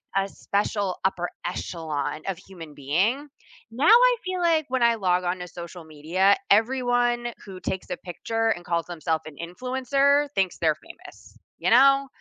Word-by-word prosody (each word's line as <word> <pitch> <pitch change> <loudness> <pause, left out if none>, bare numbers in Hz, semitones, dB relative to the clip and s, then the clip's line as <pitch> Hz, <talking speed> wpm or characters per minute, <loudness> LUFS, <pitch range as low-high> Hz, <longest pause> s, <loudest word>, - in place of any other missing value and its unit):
a 195 0 +1
special 200 -1 -2
upper 175 -2 0 0.2
echelon 160 -4 -4
of 190 -3 -2
human 175 -5 -12
being. 190 - 0 0.4
Now 240 +6 -4
I - - +7
feel 370 0 -3
like 330 -3 +2
when 260 -1 -1
I 235 0 +4
log 180 -4 +1
on 180 +1 -1
to 180 - -6
social 170 0 -9
media, 165 +6 +1
everyone 240 +1 +2
who 190 -2 -9
takes 190 0 -4
a 180 - -3
picture 225 +5 -2
and 175 - -11
calls 170 -1 -1
themself 160 -2 -2
an 155 -2 -10
influencer 265 +8 +1
thinks 190 -3 0
they're 160 -2 +2
famous. - - -15 0.2
You - - -1
know? 275 +2 +6
195 Hz, 160 wpm, -25 LUFS, 175-250 Hz, 0.4 s, I